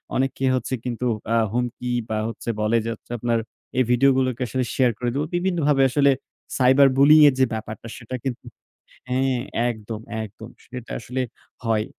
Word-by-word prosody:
অনেককে 135 0 0
হচ্ছে 125 +1 -3
কিন্তু 125 0 -3 0.3
আ - - +4 0.2
হুমকি 125 0 -2 0.2
বা 110 - -1
হচ্ছে 115 +1 -6
বলে 105 +2 +2
যে - - -2
হচ্ছে - - -19
আপনার, 115 0 +1 0.4
"এই - - +5
ভিডিও 135 +3 +5
গুলোকে 130 -2 0
আসলে 130 +1 -1
শেয়ার 125 -2 +3
করে 120 +1 -1
দিবো।" 145 +2 -1
বিভিন্নভাবে 165 -6 +2
আসলে 140 0 +4 0.5
সাইবার 135 +2 +6
বুলিং 150 +3 +7
এর - - -1
যে 130 - +6
ব্যাপারটা 110 +1 -6
সেটা 130 +1 -6
কিন্তু 125 -2 -4 0.6
হ্যাঁ, 130 0 +1 0.3
একদম, 110 -1 -6 0.2
একদম। 110 +2 -10 0.2
সেটা 125 -2 -9
আসলে 125 +2 -3 0.4
হয়। 110 -1 +1
125 Hz, 165 wpm, -23 LUFS, 115-135 Hz, 0.6 s, বুলিং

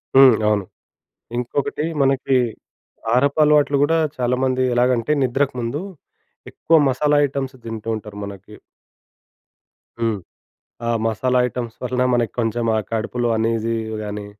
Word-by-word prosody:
హ్మ్. 135 -3 +8
అవును. 105 -2 +1 0.7
ఇంకొకటి, 140 +4 -2 0.2
మనకి 135 -1 +2 0.7
కారపలవాట్లు 145 +4 +3
కూడా 165 +3 +2 0.2
చాలామంది 130 +1 +1
ఎలాగంటే 120 +1 +2
నిద్రకు 135 +2 0
ముందు, 120 +6 -3 0.7
ఎక్కువ 165 - +1
మసాలా 145 +3 +2
ఐటెమ్స్ 135 -1 -4
తింటూ 115 -1 -5
ఉంటారు 105 -1 -9
మనకి. 100 +1 -10 1.5
హ్మ్. 115 -2 +1 0.7
ఆ - - +2 0.2
మసాలా 125 +4 +1
ఐటెమ్స్ 120 -2 -5
వలన 125 0 -1
మనకి 120 -2 0
కొంచెం 115 0 0
ఆ - - +2
కడుపులో 120 +2 -1
అనీజీ 115 0 0 0.3
గాని, 105 -1 -5
125 Hz, 115 wpm, -21 LUFS, 115-135 Hz, 1.5 s, హ్మ్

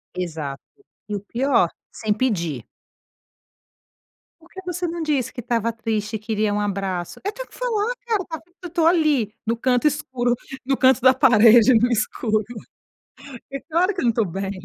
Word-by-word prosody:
Exato. 155 -6 -4 0.5
E 210 - -2
o - - -2
pior, 235 -2 +1 0.2
sem 215 -2 -1
pedir. 170 - -1 1.8
"Por 335 - -20
que 380 - -10
você 355 0 -2
não 335 0 -4
disse 275 -5 0
que - - -9
estava 230 -1 0
triste 220 -1 -3
e - - -3
queria 215 -1 -1
um 205 - 0
abraço?" 195 -4 -3
Eu 405 - -1
tenho - - -8
que - - -23
falar, 470 -2 -1
cara. 375 -8 -2 0.2
Eu - - -4
estou 330 -1 +2
ali, 305 - +2
no 230 +1 0
canto 250 +4 +2
escuro, 255 -4 0 0.3
no 270 +1 +1
canto 260 0 +4
da 260 +1 +7
parede 240 -2 +6
e - - +5
no 245 +2 +2
escuro. 215 -1 0 1.1
É 275 - -4
claro 345 +5 0
que 365 - -3
eu - - -3
não 235 - +4
estou 225 -2 0
bem. 195 +3 -4
240 Hz, 175 wpm, -22 LUFS, 210-310 Hz, 1.8 s, da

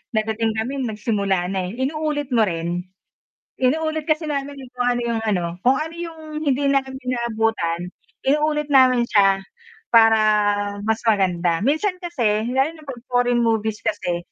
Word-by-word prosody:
dadating 220 +1 0
kami, 245 +6 -2
nagsimula 210 -6 -1
na, 195 - -1
eh. 190 - -7
Inuulit 295 -1 -2
mo 225 -3 +3
rin? 170 +1 -3 0.7
Inuulit 315 +4 0
kasi 310 0 0
namin 280 0 -3
kung 265 -3 -11
paano 245 0 +1
yung 230 -1 -1
ano, 185 -5 +1 0.2
kung 255 +2 +5
ano 310 +3 -3
yung 335 -1 -7 0.2
hindi 285 -2 0
namin 270 -1 0
naabutan, 225 -8 -1 0.4
inuulit 300 +1 +1
namin 255 -3 +5
siya 195 -1 +3 0.5
para 225 -1 +6 0.7
mas 220 0 +1
maganda. 180 -6 +1
Minsan 360 +6 0
kasi 235 - 0
lalo 270 +4 +2
na - - -14
'pag 250 -3 -7
foreign 245 -1 +2
movies 220 -2 0
kasi, 175 -4 -2
240 Hz, 145 wpm, -21 LUFS, 210-280 Hz, 0.7 s, para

